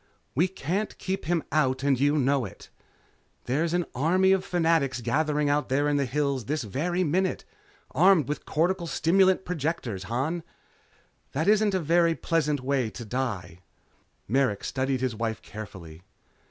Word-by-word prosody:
"We 170 +8 +3
can't 190 +3 -3
keep 190 0 -3
him 170 -1 0
out 135 -3 +1
and 140 -3 +2
you 145 +2 +3
know 140 -1 +2
it. 100 - -10 0.7
There's 160 +7 0
an 175 -1 +1
army 180 +8 +3
of 190 -1 +3
Fanatics 165 -7 +1
gathering 150 +5 0
out 145 +1 +1
there 140 +3 +2
in 145 0 +2
the 140 -2 0
hills 140 -2 -1
this 150 +1 -2
very 175 - -1
minute. 185 +4 0 0.5
Armed 175 -1 +4
with 150 - -3
cortical 170 +2 0
stimulant 190 +4 +3
projectors, 145 - -3
Han. 135 - -2 0.9
That 160 +6 -1
isn't 210 -1 +4
a 170 -1 +3
pleasant 150 -5 0
way 130 -3 0
to 120 +2 -8
die 105 -8 -3 0.3
" - - -40
Merrick 125 -4 +1
studied 130 0 -1
his 130 -2 0
wife 110 0 -2
carefully. 90 -6 -9
145 Hz, 155 wpm, -27 LUFS, 130-170 Hz, 0.9 s, Armed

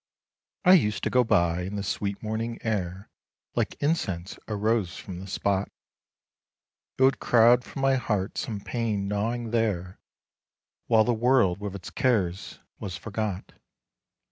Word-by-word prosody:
I 180 - +8
used 105 - +3
to - - 0
go 125 0 +4
by, 85 -6 +2
and 95 +3 -4
the 100 - -3
sweet 100 0 -3
morning 115 +2 -3
air, 95 -3 -3 0.4
Like - - -1
incense, 95 - -1
arose 105 -3 0
from 90 -3 -8
the 95 - -8
spot, 100 0 0 1.3
It 130 - +3
would 135 +1 +4
crowd 120 +1 +5
from 135 - -6
my 135 0 +4
heart 105 -5 -1
some 105 -3 -3
pain 110 -4 -2
gnawing 115 +3 -2
there, 100 -6 -1 0.9
While 110 -2 +5
the 120 - +1
world 115 -6 +3
with 100 -1 -5
its 95 - -8
cares 95 -8 0 0.2
was 90 -3 -5
forgot. 105 0 -4
105 Hz, 145 wpm, -27 LUFS, 95-120 Hz, 1.3 s, I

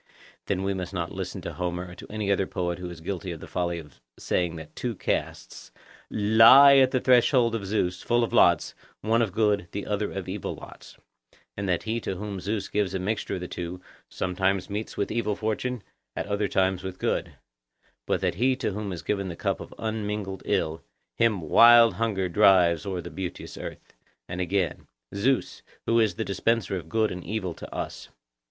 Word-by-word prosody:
Then 95 -1 -1
we 100 0 0
must 95 0 -5
not 85 -1 -2
listen 95 0 -5
to - - -6
Homer 90 0 -3
or - - -9
to - - -11
any 105 -2 -2
other 95 -1 +1
poet 90 -1 -3
who 90 -1 -5
is 85 -2 -10
guilty 90 +1 -4
of 85 - -7
the - - -9
folly 85 -1 -2
of 75 -6 -12 0.2
saying 85 -2 -1
that 80 -1 -10
two 120 -3 -3
casks - - -4 0.4
'Lie 115 +7 +8
at 130 -1 +6
the 130 - +1
threshold 125 -1 +4
of 105 -4 -3
Zeus, 90 -3 -1
full 120 0 +2
of 115 - -3
lots, 85 -3 +4 0.3
one 115 +2 +2
of 110 -4 0
good, 105 -2 +1
the 100 - -4
other 105 0 -2
of 95 -2 -5
evil 95 0 -4
lots,' - - -13 0.6
and 100 -1 -3
that 90 -2 0
he 115 +1 -1
to 95 - -3
whom 100 0 -5
Zeus 105 +2 -3
gives 100 -2 -1
a - - -1
mixture 105 +4 -2
of 90 - -5
the 90 - -4
two 90 +1 -6 0.3
'Sometimes 95 +1 -1
meets 105 +2 -4
with 100 - -1
evil 110 -2 0
fortune, 110 +2 -2 0.3
at - - -3
other 100 0 -1
times 95 -1 +1
with 95 0 -6
good;' - - -1 0.7
but - - 0
that - - +1
he 130 +1 +4
to 125 -4 -2
whom 100 0 -4
is 85 -5 -6
given 100 -2 -1
the 85 - -5
cup - - -1
of - - -9
unmingled 105 -3 -3
ill, 80 +1 0 0.4
'Him 115 -5 +3
wild 115 +8 +7
hunger 105 -5 -1
drives 90 -2 +4
o'er 95 -2 -2
the 85 - -9
beauteous 90 +2 -6
earth.' - - -9 0.3
And 90 - -4
again— 90 -1 -1 0.3
'Zeus, 130 +7 0 0.2
who 115 0 +3
is 110 -6 +2
the - - -3
dispenser 100 +1 0
of 85 -3 -6
good 110 +2 +1
and 90 0 -6
evil 95 -2 -3
to - - -10
us. - - -6
100 Hz, 200 wpm, -26 LUFS, 90-110 Hz, 0.7 s, Lie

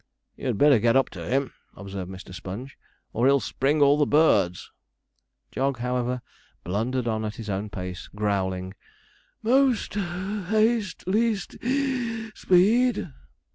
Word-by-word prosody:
'You'd - - -2
better 145 -2 +6
get 115 +3 +3
up 135 - +3
to - - -7
him,' 135 0 0 0.2
observed 95 -2 -7
Mr. 95 -1 -10
Sponge, 105 +9 -7 0.4
'or 120 +3 +2
he'll 140 0 +5
spring 145 +3 +1
all 140 +1 +5
the 145 - +3
birds.' 100 - +3 0.8
Jog, 135 0 -1
however, 125 0 -2 0.4
blundered 115 +7 -1
on 110 -1 -1
at 105 0 -4
his 110 -3 -5
own 100 +2 -3
pace, 90 -2 -6
growling: 95 -3 -2 0.7
'Most 255 0 +2
(puff) 190 0 -3
haste, 215 -3 +1
least 210 0 0
(wheeze) 245 -4 -1
speed.' 215 - +3
135 Hz, 135 wpm, -25 LUFS, -, 0.8 s, better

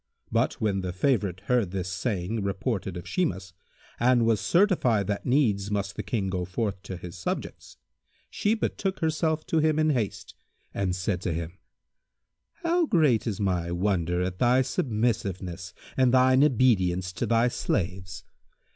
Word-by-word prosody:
But, - - +2
when 100 -3 -1
the 90 -1 -3
favourite 95 -4 0
heard 115 -2 +1
this 90 -1 -3
saying 100 +1 -2
reported 100 -1 -2
of 90 +1 -8
Shimas 95 - -2 0.5
and 120 -1 +4
was 110 -3 +2
certified 130 - +3
that 100 +1 -3
needs 110 -7 +2
must 100 -1 -2
the - - -3
King 105 -5 -2
go 90 -1 -2
forth 95 +2 -3
to 95 - -7
his 90 0 -9
subjects, 90 - -5 0.5
she 210 +2 +1
betook 195 -3 -2
herself 160 0 0
to 160 - +1
him 155 0 +2
in 155 0 +3
haste 115 -8 -3 0.4
and 95 -2 -1
said 90 0 -2
to 90 -3 -2
him, 85 +3 -5 1.0
"How 340 0 +2
great 135 - +3
is 105 -3 -2
my 90 -4 0
wonder 90 -1 0
at 90 0 -4
thy 125 +2 +4
submissiveness 100 -8 -2 0.2
and 130 -2 +3
thine 130 +1 +5
obedience 95 -10 +2
to - - -2
thy 115 +1 +3
slaves! 95 -4 -3
100 Hz, 155 wpm, -27 LUFS, 95-130 Hz, 1.0 s, thine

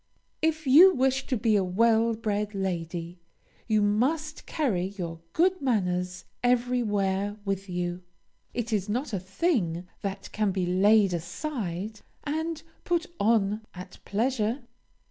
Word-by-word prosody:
If 315 -1 0
you 330 +9 +8
wish 265 0 +1
to 255 - 0
be 220 -1 +2
a 200 - +3
well 225 +4 +3
bred 210 -2 -2
lady, 175 -2 -3 0.5
you 215 -2 +3
must 290 +10 0
carry 205 - 0
your 165 -3 -4
good 370 +1 +2
manners 180 -7 -1 0.2
everywhere 210 -5 +1
with 195 0 -2
you. 175 0 -3 0.5
It 235 -1 -3
is 205 -1 0
not 245 +3 -2
a 195 - 0
thing 185 - -1
that 195 0 -5
can 215 -1 +1
be 185 -1 -1
laid 195 +2 +4
aside 200 - -4 0.2
and 320 +2 -3 0.2
put 345 0 0
on 210 -1 +2
at 180 +1 -10
pleasure. 235 +3 0
210 Hz, 130 wpm, -27 LUFS, 185-255 Hz, 0.5 s, you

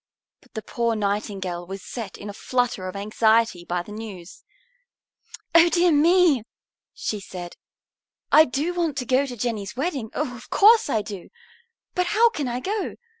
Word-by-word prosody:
But - - -26
the 220 - -4
poor 235 -1 -1
Nightingale 200 -4 -3
was 195 0 -7
set 225 -6 -7
in 205 - -9
a 205 - -6
flutter 245 -5 -1
of 185 - -7
anxiety 220 -1 +2
by 175 0 -2
the 210 - -12
news. 205 -5 -9 1.1
"Oh, 335 +1 +7
dear 345 +1 +3
me!" 325 -2 +4 0.5
she 210 - -4
said, 180 -3 -8 0.8
"I 315 - +8
do 290 +7 -2
want 335 -5 -1
to 250 - -2
go 260 +3 +2
to 245 -2 -7
Jenny's 215 -3 -3
wedding, 270 -6 -2
oh, 275 -4 -2
of 240 +1 -13
course 440 -3 +5
I 220 -5 0
do! 200 -3 -8 0.6
But 360 -1 0
how 465 +1 +6
can 295 - -3
I 245 0 -2
go? 410 +4 -3
235 Hz, 170 wpm, -24 LUFS, 200-305 Hz, 1.1 s, I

